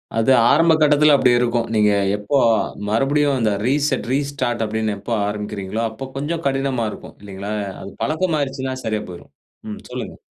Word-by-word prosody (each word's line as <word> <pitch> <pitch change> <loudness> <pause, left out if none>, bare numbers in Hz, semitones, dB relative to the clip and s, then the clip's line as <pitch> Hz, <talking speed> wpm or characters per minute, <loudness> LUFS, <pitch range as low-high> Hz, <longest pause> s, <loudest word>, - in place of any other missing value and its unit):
அது 115 +3 +2 0.2
ஆரம்ப 165 +2 +5
கட்டத்தில 150 0 +5
அப்படி 130 -2 +4
இருக்கும். 120 -1 0
நீங்க 105 -1 +4 0.2
எப்போ 105 +7 -1 0.5
மறுபடியும் 140 +5 +2
அந்த 110 -2 +1 0.2
ரீசெட் 140 0 0
ரீஸ்டார்ட் 135 -4 -1
அப்படின்னு 110 0 -2
எப்போ 115 +4 -5
ஆரம்பிக்கிறீர்களோ, 105 0 -4
அப்போ 110 +4 -7
கொஞ்சம் 160 +4 -3
கடினமா 135 -3 -1
இருக்கும் - - -11
இல்லைங்களா? 100 0 -7 0.3
அது 100 - -8
பழக்கம் 160 +2 0
ஆயிடுச்சுன்னா 135 -2 -3
சரியா 110 -1 -1
போய்ரும். 85 - -11 0.4
ம் 105 - -6
சொல்லுங்க. - - -6
130 Hz, 150 wpm, -20 LUFS, 110-145 Hz, 0.5 s, ஆரம்ப